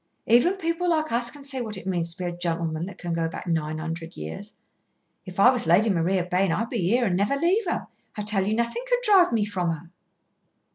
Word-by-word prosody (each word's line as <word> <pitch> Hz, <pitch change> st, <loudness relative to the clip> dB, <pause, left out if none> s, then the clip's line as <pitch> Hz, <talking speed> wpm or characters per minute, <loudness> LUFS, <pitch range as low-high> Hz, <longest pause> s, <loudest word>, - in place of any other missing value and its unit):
Even 245 Hz, +11 st, +4 dB
people 350 Hz, -1 st, -1 dB
like 315 Hz, -4 st, +1 dB
us 235 Hz, +1 st, +1 dB
can 285 Hz, +2 st, -11 dB
see 270 Hz, -2 st, -3 dB
what 215 Hz, -4 st, -4 dB
it 190 Hz, -, -9 dB
means 170 Hz, -3 st, 0 dB
to 180 Hz, -1 st, -5 dB
a 175 Hz, -, -1 dB
gentleman 170 Hz, -1 st, -2 dB
that 200 Hz, -, -10 dB
can 175 Hz, -1 st, -4 dB
go 165 Hz, 0 st, 0 dB
back 165 Hz, -, -7 dB
nine 155 Hz, -3 st, -1 dB
hundred 165 Hz, +1 st, -6 dB
years. 80 Hz, -, -8 dB, 0.7 s
If 185 Hz, +1 st, -8 dB
I 245 Hz, +6 st, +8 dB
was 245 Hz, -9 st, 0 dB
Lady 200 Hz, +6 st, +4 dB
Maria 180 Hz, +1 st, +1 dB
Bayne, 180 Hz, 0 st, +1 dB
I'd 230 Hz, +7 st, -1 dB
be 235 Hz, -, -1 dB
here 230 Hz, +8 st, +2 dB
and 185 Hz, -5 st, +1 dB
never 200 Hz, +8 st, +1 dB
leave 360 Hz, +9 st, +1 dB
her. -, -, -2 dB, 0.3 s
I 210 Hz, -, -2 dB
tell 200 Hz, -2 st, +1 dB
you 215 Hz, -, +1 dB
nothing 235 Hz, -, -1 dB
could -, -, +2 dB
drive 390 Hz, -6 st, +5 dB
me 220 Hz, -3 st, +1 dB
from 180 Hz, -5 st, -1 dB
her." 165 Hz, +2 st, -10 dB
195 Hz, 230 wpm, -25 LUFS, 170-245 Hz, 0.7 s, I